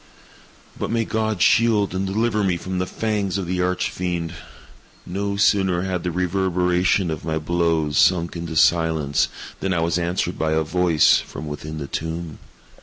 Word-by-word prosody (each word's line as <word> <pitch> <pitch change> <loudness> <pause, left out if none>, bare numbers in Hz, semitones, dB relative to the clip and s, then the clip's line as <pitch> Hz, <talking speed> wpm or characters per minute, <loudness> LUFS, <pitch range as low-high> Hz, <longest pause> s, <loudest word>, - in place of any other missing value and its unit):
But - - -2
may 115 -1 0
God 110 -4 0
shield 110 -5 +3
and 95 +1 -1
deliver 105 +1 0
me 90 -3 +1
from 95 +1 -4
the 90 - -1
fangs 105 -3 -1
of 95 - -3
the 90 +1 -1
Arch 90 +1 0
Fiend! 85 -2 -3 0.7
No 100 +2 -3
sooner 95 -3 +2
had 95 -2 -2
the 90 - -2
reverberation 90 0 +1
of 80 - -5
my 80 0 -1
blows 80 -2 0
sunk 85 -2 +3
into 85 -1 -5
silence, 80 -4 +2 0.3
than 95 - -1
I - - +1
was 85 +1 +1
answered 85 +1 -2
by 80 -1 +1
a 80 0 +2
voice 85 -1 +3
from 80 - -8
within 75 +1 -6
the 75 - -4
tomb! 80 +2 -5
90 Hz, 170 wpm, -22 LUFS, 80-95 Hz, 0.7 s, shield